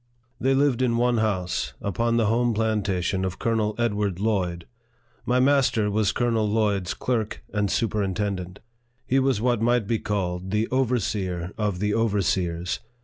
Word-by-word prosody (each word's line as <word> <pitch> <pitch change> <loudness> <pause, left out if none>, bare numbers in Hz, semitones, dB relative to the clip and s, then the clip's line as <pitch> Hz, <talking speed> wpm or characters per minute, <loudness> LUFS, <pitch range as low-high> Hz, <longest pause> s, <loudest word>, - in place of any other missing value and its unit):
They 135 +1 +2
lived 135 -3 +2
in 120 -2 +2
one 120 -1 +2
house, 95 -5 -1
upon 115 +4 0
the 115 - +3
home 115 +2 +2
plantation 100 -4 0
of 95 -1 -3
Colonel 110 -2 0
Edward 105 -5 0
Lloyd. 90 -6 -1 0.6
My 125 +1 +3
master 130 -6 +3
was 105 0 +2
Colonel 115 -3 +1
Lloyd's 105 -4 0
clerk 115 -4 -2
and 105 -1 0
superintend 100 -2 -1
ent. 90 +2 -9 0.5
He 135 - +2
was 130 -5 +1
what 120 -2 +1
might 120 -1 +2
be 115 +1 0
called 95 -3 -2
the 105 +3 0
overseer 100 -9 -1
of 105 -4 -1
the 105 +2 0
overseers. 95 -5 0
105 Hz, 150 wpm, -25 LUFS, 95-115 Hz, 0.6 s, the